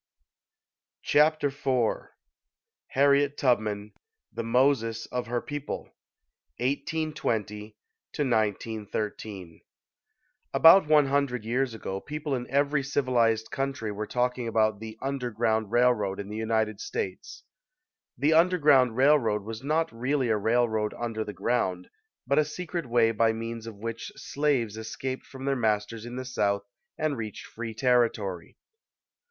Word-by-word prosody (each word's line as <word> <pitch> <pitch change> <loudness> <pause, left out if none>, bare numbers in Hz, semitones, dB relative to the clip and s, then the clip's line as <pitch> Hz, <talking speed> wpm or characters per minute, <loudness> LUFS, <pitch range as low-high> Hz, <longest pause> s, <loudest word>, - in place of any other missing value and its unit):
Chapter 150 -1 +3
IV 135 -4 -1 0.8
HARRIET 140 +1 +3
TUBMAN 105 -5 0 0.4
THE - - -3
MOSES 115 -1 +1
OF 125 -1 -2
HER 120 0 -1
PEOPLE 145 -1 -6 0.6
1820 120 -7 -2 0.4
1913 105 - -2 0.9
ABOUT 165 +1 +8
one 150 -1 +5
hundred 135 -4 0
years 125 +1 0
ago, 95 -3 -4
people 150 -1 -4
in 125 -2 -3
every 140 +1 +2
civilized 120 -5 +1
country 135 -5 -2
were 105 +1 -4
talking 125 -1 -1
about 110 -2 +1
the 110 0 -8
"underground 115 -5 -1
railroad" 120 -5 +2
in 100 0 -6
the 105 - -6
United 110 -1 0
States. 455 - -5 0.7
The 145 +6 +3
"underground 150 -8 +4
railroad" 130 -7 +3
was 110 +2 -7
not 155 +3 0
really 130 +2 0
a 110 - +3
railroad 110 0 +1
under 115 -2 -2
the 105 - -6
ground, 95 -3 -1 0.3
but 140 +4 +3
a - - +5
secret 170 0 -5
way 115 -1 +3
by 115 0 +2
means 115 0 -5
of 115 - -7
which 115 +2 -5
slaves 135 -7 -1
escaped 130 +4 -5
from 130 0 -9
their 140 0 +1
masters 110 -1 -1
in 120 - -7
the 130 0 -5
South 100 -5 0 0.3
and 155 -2 0
reached 110 -2 -6
free 115 -1 -7
territory. 115 -8 0
120 Hz, 125 wpm, -27 LUFS, 110-140 Hz, 0.9 s, ABOUT